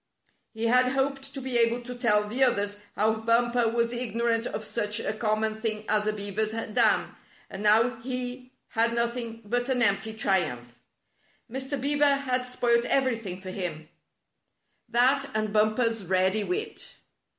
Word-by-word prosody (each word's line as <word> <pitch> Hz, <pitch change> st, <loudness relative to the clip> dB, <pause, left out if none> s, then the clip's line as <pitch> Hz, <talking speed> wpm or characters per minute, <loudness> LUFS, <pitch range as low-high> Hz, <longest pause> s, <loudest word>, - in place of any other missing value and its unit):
He 225 Hz, 0 st, -4 dB
had 250 Hz, +2 st, +4 dB
hoped 270 Hz, 0 st, -1 dB
to 275 Hz, -, -6 dB
be 255 Hz, -2 st, 0 dB
able 235 Hz, +1 st, +2 dB
to 250 Hz, +1 st, -6 dB
tell 210 Hz, -4 st, +2 dB
the 245 Hz, +6 st, +1 dB
others 205 Hz, -5 st, +1 dB, 0.2 s
how 220 Hz, +2 st, +2 dB
Bumper 235 Hz, +1 st, +2 dB
was 235 Hz, +1 st, 0 dB
ignorant 235 Hz, -1 st, 0 dB
of 220 Hz, -, -5 dB
such 210 Hz, 0 st, -1 dB
a -, -, -2 dB
com 215 Hz, 0 st, 0 dB
mon 220 Hz, 0 st, -2 dB
thing 215 Hz, -2 st, -2 dB
as 210 Hz, 0 st, +1 dB
a -, -, +3 dB
beaver's 210 Hz, +1 st, -2 dB
dam, 225 Hz, -1 st, +1 dB, 0.4 s
and 190 Hz, -, -6 dB
now 225 Hz, +3 st, +4 dB
he 250 Hz, +1 st, -5 dB, 0.2 s
had 230 Hz, +1 st, +1 dB
nothing 235 Hz, -1 st, -2 dB
but 245 Hz, +4 st, -1 dB
an 250 Hz, -2 st, +2 dB
empty 220 Hz, +1 st, +1 dB
triumph. 125 Hz, -, -1 dB, 0.7 s
Mr. 265 Hz, +2 st, -3 dB
Beaver 285 Hz, +1 st, +3 dB
had 255 Hz, -2 st, -2 dB
spoilt 240 Hz, -1 st, +1 dB
everything 230 Hz, -9 st, 0 dB
for 185 Hz, -1 st, -7 dB
him 165 Hz, -5 st, -5 dB, 0.5 s
— -, -, -47 dB
that 275 Hz, +2 st, +3 dB
and 215 Hz, -1 st, -1 dB
Bumper's 215 Hz, +1 st, +2 dB
ready 190 Hz, +3 st, +1 dB
wit. 430 Hz, -, -4 dB
230 Hz, 160 wpm, -27 LUFS, 215-250 Hz, 0.7 s, had